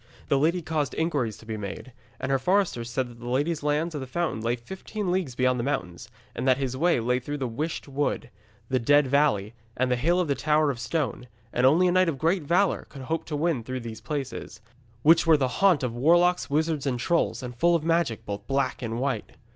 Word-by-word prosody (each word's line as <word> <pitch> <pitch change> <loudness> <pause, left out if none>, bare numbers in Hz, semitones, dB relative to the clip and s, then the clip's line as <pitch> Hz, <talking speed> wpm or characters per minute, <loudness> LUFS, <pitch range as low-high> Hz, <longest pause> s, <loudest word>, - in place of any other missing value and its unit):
The 140 - +3
lady 170 +4 +1
caused 155 -3 -2
inquiries 145 -10 -1
to - - -15
be 110 -1 -4
made, 105 +5 -7 0.3
and 130 - -2
her 135 - +2
foresters 175 -7 +1
said 130 +1 -1
that 120 -1 -14
the 120 +1 -6
lady's 145 +6 0
lands 150 +3 0
of 145 - -4
the 130 - -6
fountain 165 -5 -2
lay 115 +2 0
fifteen 190 - -5
leagues 175 -9 -1
beyond 130 0 +2
the - - -1
mountains, 90 - -3 0.3
and - - -2
that 130 -1 +5
his 130 -2 -2
way 165 +1 +2
lay 125 +2 +1
through 145 +4 -5
the 135 -3 -2
Wisht 150 +9 -4
Wood, 140 +1 -2 0.4
the 130 -1 +1
Dead 145 +5 +4
Valley, 130 -7 +2 0.2
and 130 0 +1
the - - +4
Hill 170 +9 +2
of 180 - +1
the 140 - +2
Tower 150 +2 +2
of 125 - -7
Stone, 125 0 -2 0.3
and 125 +1 +4
only 170 +7 +4
a - - +3
knight 185 -1 +4
of 150 - -3
great 165 +6 +1
valour 175 +6 +1
could 135 - -9
hope 160 +5 -2
to 150 - -4
win 150 -5 0
through 130 +2 -4
these 115 -1 -8
places, 130 -4 -5 0.4
which 165 +2 +5
were 160 -2 +7
the 135 -2 +1
haunt 180 +3 +3
of 125 -2 -1
warlocks, 175 +8 +3
wizards, 155 -1 0
and 125 -2 -1
trolls, 165 0 0
and 125 -1 -6
full 170 +7 +3
of 165 - 0
magic, 165 -8 0
both 100 0 -6
black 135 -1 0
and 115 -1 -3
white. 130 -5 -2
140 Hz, 230 wpm, -26 LUFS, 125-165 Hz, 0.4 s, were